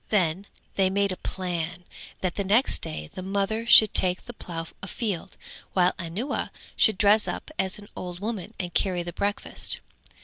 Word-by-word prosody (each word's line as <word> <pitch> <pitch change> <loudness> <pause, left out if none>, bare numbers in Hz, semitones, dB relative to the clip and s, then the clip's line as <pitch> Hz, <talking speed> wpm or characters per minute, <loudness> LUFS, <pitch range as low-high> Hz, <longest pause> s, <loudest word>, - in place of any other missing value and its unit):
Then 190 -1 +2 0.3
they 190 -1 +4
made 200 0 +2
a - - -1
plan 180 -2 -3 0.4
that 185 -2 0
the 200 - -1
next 215 +7 +3
day 75 0 -5
the - - -5
mother 200 +4 -1
should 215 -3 +9
take 185 -1 +2
the 240 - -9
plough 165 -6 -6
afield, 200 -3 -3 0.4
while 180 -1 +4
Anuwa 190 - -2 0.3
should 220 -4 +4
dress 210 +1 +5
up - - -4
as 190 0 +1
an 205 -1 -11
old 180 -1 -5
woman 215 0 -4
and 175 -2 -3
carry 180 -3 +1
the 175 0 -6
breakfast. 205 +3 -1
190 Hz, 170 wpm, -27 LUFS, 180-205 Hz, 0.4 s, should